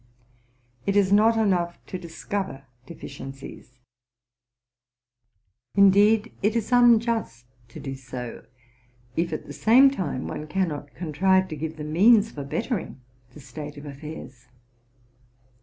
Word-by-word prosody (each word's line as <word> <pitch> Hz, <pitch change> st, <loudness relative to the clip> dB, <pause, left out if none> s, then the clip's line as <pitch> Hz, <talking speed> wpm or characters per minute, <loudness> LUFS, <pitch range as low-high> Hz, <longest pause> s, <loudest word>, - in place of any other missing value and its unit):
198 200 Hz, -, +1 dB
'Jt 205 Hz, -1 st, +4 dB
is 190 Hz, -, 0 dB
not 220 Hz, +2 st, +5 dB
enough 180 Hz, -6 st, 0 dB
to 185 Hz, -, -6 dB
discover 170 Hz, -3 st, -5 dB, 0.2 s
deficiencies: 135 Hz, -5 st, -10 dB, 2.0 s
indeed, 205 Hz, +3 st, +5 dB
it 210 Hz, +3 st, +1 dB
is 230 Hz, 0 st, -2 dB
unjust 230 Hz, -, +3 dB, 0.2 s
to 115 Hz, -, -11 dB
do 135 Hz, -, -5 dB
so, 125 Hz, -2 st, -8 dB, 0.7 s
if 170 Hz, +1 st, 0 dB
at 155 Hz, -, -4 dB
the -, -, -9 dB
same 260 Hz, +5 st, +6 dB
time 165 Hz, -, -3 dB
one 150 Hz, -, -6 dB
cannot 155 Hz, -5 st, -3 dB
contrive 185 Hz, +3 st, +2 dB
to 155 Hz, -, -5 dB
give 160 Hz, +2 st, -5 dB
the 150 Hz, -, -6 dB
means 205 Hz, +8 st, +4 dB
for 145 Hz, -, -6 dB
bettering 215 Hz, -, -3 dB, 0.4 s
the -, -, -11 dB
state 150 Hz, +1 st, -9 dB
of 145 Hz, -, -10 dB
affairs. 140 Hz, -3 st, -10 dB
170 Hz, 125 wpm, -25 LUFS, 145-210 Hz, 2.0 s, same